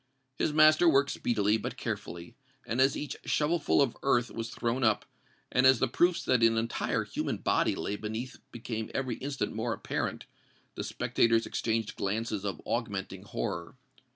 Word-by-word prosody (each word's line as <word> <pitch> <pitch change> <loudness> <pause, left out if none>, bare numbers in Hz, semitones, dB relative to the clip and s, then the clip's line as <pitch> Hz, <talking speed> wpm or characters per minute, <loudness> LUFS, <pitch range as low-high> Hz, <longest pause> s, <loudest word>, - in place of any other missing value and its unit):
His - - +2
master 155 +2 +6
worked 140 -2 +3
speedily, 105 -2 +1
but 110 - -5
carefully; 85 +7 -5 0.3
and 120 +3 0
as 135 +1 +4
each 150 - -4
shovel 160 +3 +1
full 145 - +3
of 125 - -2
earth 120 -3 +2
was 115 0 -4
thrown 120 +3 -1
up, 110 -3 +2 0.5
and 125 - +3
as 130 -1 +7
the 130 - +1
proofs 175 +8 +2
that 125 -2 +3
an 115 0 +4
entire 115 +1 0
human - - -3
body - - +1
lay 105 - -3
beneath 110 +4 -5
became 110 -2 -5
every 130 -4 -1
instant 140 0 -3
more 115 +2 -1
apparent, - - -3 0.5
the - - -5
spectators 115 -1 +1
exchanged 115 -1 -2
glances 105 0 -2
of 95 -6 -3
augmenting 100 -5 -3
horror. 95 -2 -4
115 Hz, 165 wpm, -30 LUFS, 110-135 Hz, 0.5 s, as